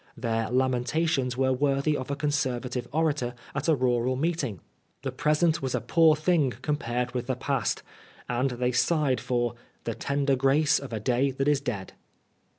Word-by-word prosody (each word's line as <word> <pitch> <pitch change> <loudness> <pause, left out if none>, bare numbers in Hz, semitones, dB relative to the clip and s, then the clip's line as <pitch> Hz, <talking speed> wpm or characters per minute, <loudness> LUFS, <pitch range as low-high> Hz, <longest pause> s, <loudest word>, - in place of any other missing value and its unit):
Their 115 -2 -1
lamentations 130 +1 +1
were 130 0 +2
worthy 140 +2 +1
of 130 -1 -4
a 140 - -1
Conservative 130 -4 -1
orator 145 -5 0 0.2
at 140 +3 -2
a 160 - +5
rural 125 -1 +1
meet 160 +4 0
ing. 105 -9 -4 0.4
The 135 - -2
present 155 +4 +2
was 130 -2 -1
a - - +1
poor 155 +7 +4
thing 155 -4 +2
compared 125 -5 -1
with 125 -1 -3
the 130 - 0
past, 135 +2 -1 0.4
and 125 +2 0
they 125 0 -1
sighed 135 -2 +2
for 120 -1 0 0.2
" - - -38
the - - -2
tender 140 -1 0
grace 135 +3 +3
of 140 -3 -8
a 110 - -2
day 125 +5 +1
that 135 +1 -2
is 145 -2 +3
dead." 105 -8 -4
130 Hz, 175 wpm, -27 LUFS, 125-145 Hz, 0.4 s, a